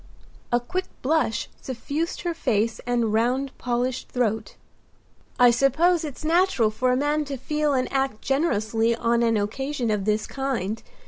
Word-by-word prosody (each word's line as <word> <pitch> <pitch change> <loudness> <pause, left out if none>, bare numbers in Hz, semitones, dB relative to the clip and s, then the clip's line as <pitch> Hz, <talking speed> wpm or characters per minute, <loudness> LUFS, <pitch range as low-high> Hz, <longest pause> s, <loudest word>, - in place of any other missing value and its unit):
A 240 - +4
quick 365 +10 -3 0.2
blush 295 -4 +1
suffused 285 +6 -3
her 345 -1 -1
face 230 -7 0
and 235 -3 +1
round 255 +5 +1
polished 245 +1 -2
throat. 220 -3 -1 0.8
"I 245 -1 +7
suppose 310 +8 +3
it's 300 0 -6
natural 330 - +3
for 250 +4 +1
a 250 - +2
man 295 +2 +1
to 275 -1 -4
feel 300 +2 0
and 255 -1 +1
act 270 -5 0
generously 230 -6 +1
on 235 0 +1
an 230 -1 +3
occasion 240 +4 -2
of 205 -2 -1
this 215 0 +1
kind. 235 -6 -3
250 Hz, 150 wpm, -24 LUFS, 225-290 Hz, 0.8 s, I